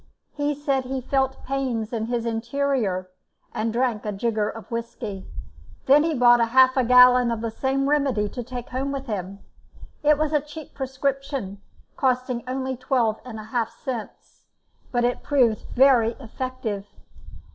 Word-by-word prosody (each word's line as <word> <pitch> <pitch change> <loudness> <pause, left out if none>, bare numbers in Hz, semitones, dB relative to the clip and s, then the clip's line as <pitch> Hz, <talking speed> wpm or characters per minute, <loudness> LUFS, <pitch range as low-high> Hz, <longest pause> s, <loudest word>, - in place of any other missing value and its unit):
He 290 0 -1
said 275 -2 -1
he 265 +1 -3
felt 265 +1 -1
pains 255 -5 -2
in 220 -1 -2
his 235 -1 -2
interior, 230 -5 -1 0.4
and 225 +1 -1
drank 235 -2 0
a 210 - -2
jigger 215 +1 -1
of 225 +2 -10
whisky. 230 -4 -5 0.6
Then 280 +3 +6
he 320 0 0
bought 240 -1 +6
half 255 +3 +5
a 260 - +3
gallon 250 0 +7
of 230 -1 -2
the 230 -1 -2
same 270 +4 0
remedy 275 -8 +1
to 245 - -6
take 245 0 -7
home 265 +2 -2
with 275 -1 -4
him. 200 -3 -5 0.6
It 300 0 +4
was 310 0 -1
a 300 - +3
cheap 300 +1 -10
prescription, 265 -6 -3 0.4
costing 255 -2 0
only 260 0 -2
twelve 240 -3 0
and 230 -3 -8
a - - -7
half 225 +1 -2
cents, 240 -5 -8 0.5
but 245 -1 +1
it 245 +1 0
proved 250 -7 +2
very 245 -3 +5
effective. 235 -4 -5
250 Hz, 155 wpm, -24 LUFS, 225-270 Hz, 0.6 s, gallon